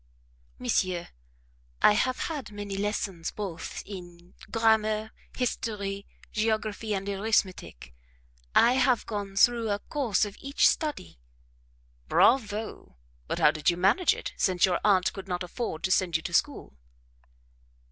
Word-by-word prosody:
"Monsieur, 185 Hz, -8 st, -1 dB, 0.7 s
I -, -, +8 dB
have 255 Hz, +4 st, 0 dB
had 290 Hz, -9 st, -4 dB
many 205 Hz, -1 st, -6 dB
lessons 195 Hz, -4 st, -2 dB
both 185 Hz, -6 st, -6 dB
in 175 Hz, -2 st, -11 dB, 0.2 s
grammar, 220 Hz, -1 st, +2 dB, 0.3 s
history, 200 Hz, -5 st, -3 dB, 0.2 s
geography, 215 Hz, -1 st, -1 dB
and 195 Hz, 0 st, -4 dB
arithmetic. 195 Hz, -, -1 dB, 0.6 s
I 240 Hz, -, +6 dB
have 255 Hz, -2 st, +2 dB
gone 200 Hz, -3 st, -5 dB
through 230 Hz, +2 st, +3 dB
a 205 Hz, -, +1 dB
course 230 Hz, -2 st, 0 dB
of 205 Hz, -1 st, -9 dB
each 275 Hz, +1 st, +3 dB
study." 290 Hz, -, -2 dB, 0.9 s
"Bravo! 220 Hz, -, +1 dB, 0.3 s
but -, -, -2 dB
how -, -, +5 dB
did 155 Hz, +1 st, +1 dB
you 175 Hz, -, 0 dB
manage 225 Hz, -, +3 dB
it, -, -, -6 dB
since 180 Hz, -2 st, +3 dB
your 185 Hz, -, 0 dB
aunt 190 Hz, -3 st, +3 dB
could 195 Hz, -1 st, -8 dB
not 180 Hz, -1 st, -2 dB
afford 180 Hz, -2 st, -5 dB
to 185 Hz, -, 0 dB
send 185 Hz, -3 st, +2 dB
you 165 Hz, -, -12 dB
to 175 Hz, -, -5 dB
school?" 285 Hz, -, 0 dB
205 Hz, 135 wpm, -28 LUFS, 185-225 Hz, 0.9 s, I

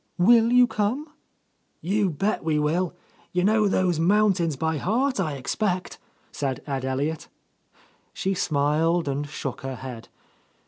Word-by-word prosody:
Will 230 Hz, +5 st, +5 dB
you 250 Hz, 0 st, +7 dB
come?" 235 Hz, +7 st, -2 dB, 0.7 s
"You 195 Hz, +3 st, 0 dB
bet 195 Hz, +7 st, -1 dB
we 160 Hz, -1 st, +1 dB
will 165 Hz, +4 st, 0 dB
I -, -, -34 dB, 0.3 s
You 180 Hz, 0 st, +1 dB
know 215 Hz, +1 st, +3 dB
those 185 Hz, -4 st, +1 dB
mountains 180 Hz, -3 st, +2 dB
by 160 Hz, +3 st, -1 dB
heart, 255 Hz, -, 0 dB
I 160 Hz, -6 st, -1 dB
expect?" 180 Hz, -, -2 dB, 0.3 s
said 135 Hz, -2 st, -3 dB
Ed 135 Hz, -3 st, -3 dB
Elliot. 140 Hz, +4 st, -2 dB, 0.8 s
She 195 Hz, -, -2 dB
smiled 160 Hz, +1 st, +1 dB
and 140 Hz, +1 st, -2 dB
shook 140 Hz, -2 st, -5 dB
her 135 Hz, -1 st, -5 dB
head. 125 Hz, -3 st, -8 dB
175 Hz, 140 wpm, -25 LUFS, 145-205 Hz, 0.8 s, you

